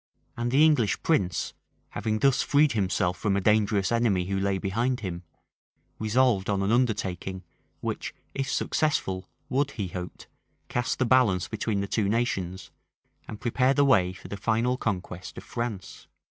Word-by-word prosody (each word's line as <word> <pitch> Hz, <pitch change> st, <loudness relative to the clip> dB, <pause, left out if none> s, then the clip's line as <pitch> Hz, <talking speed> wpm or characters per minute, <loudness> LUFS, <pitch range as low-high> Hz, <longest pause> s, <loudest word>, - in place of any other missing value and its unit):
[] -, -, -43 dB
And 120 Hz, 0 st, -2 dB
the 140 Hz, +5 st, +5 dB
English 140 Hz, -10 st, +2 dB
prince, 95 Hz, -, +1 dB, 0.4 s
having 110 Hz, +1 st, -2 dB
thus 135 Hz, +3 st, +3 dB
freed 145 Hz, 0 st, +3 dB
himself 95 Hz, -4 st, 0 dB
from 100 Hz, -2 st, +1 dB
a -, -, +2 dB
dangerous 105 Hz, -1 st, +2 dB
enemy 115 Hz, -6 st, +2 dB
who 95 Hz, +1 st, -1 dB
lay 100 Hz, 0 st, +1 dB
behind 115 Hz, +7 st, -1 dB
him, 90 Hz, -4 st, -4 dB, 0.8 s
resolved 110 Hz, -2 st, +2 dB
on 100 Hz, -1 st, +1 dB
an 100 Hz, -, +1 dB
undertaking, 100 Hz, -6 st, 0 dB, 0.4 s
which, -, -, -3 dB, 0.2 s
if 135 Hz, -1 st, -2 dB
successful, 95 Hz, -11 st, 0 dB, 0.2 s
would, 140 Hz, +2 st, +1 dB
he 100 Hz, -5 st, -3 dB
hoped, 90 Hz, 0 st, -7 dB, 0.4 s
cast 125 Hz, -1 st, -1 dB
the 130 Hz, -, +1 dB
balance 115 Hz, -7 st, +3 dB
between 110 Hz, -2 st, -2 dB
the 100 Hz, -, -3 dB
two 100 Hz, -1 st, 0 dB
nations, 95 Hz, -6 st, -2 dB, 0.6 s
and 105 Hz, -, -7 dB
prepare 130 Hz, +3 st, +2 dB
the 145 Hz, -, +4 dB
way 95 Hz, -10 st, +4 dB
for 95 Hz, -, -11 dB
the 100 Hz, -, -6 dB
final 115 Hz, +5 st, +1 dB
conquest 95 Hz, -6 st, -4 dB
of -, -, -7 dB
France. 115 Hz, -6 st, -5 dB
110 Hz, 160 wpm, -27 LUFS, 95-125 Hz, 0.8 s, the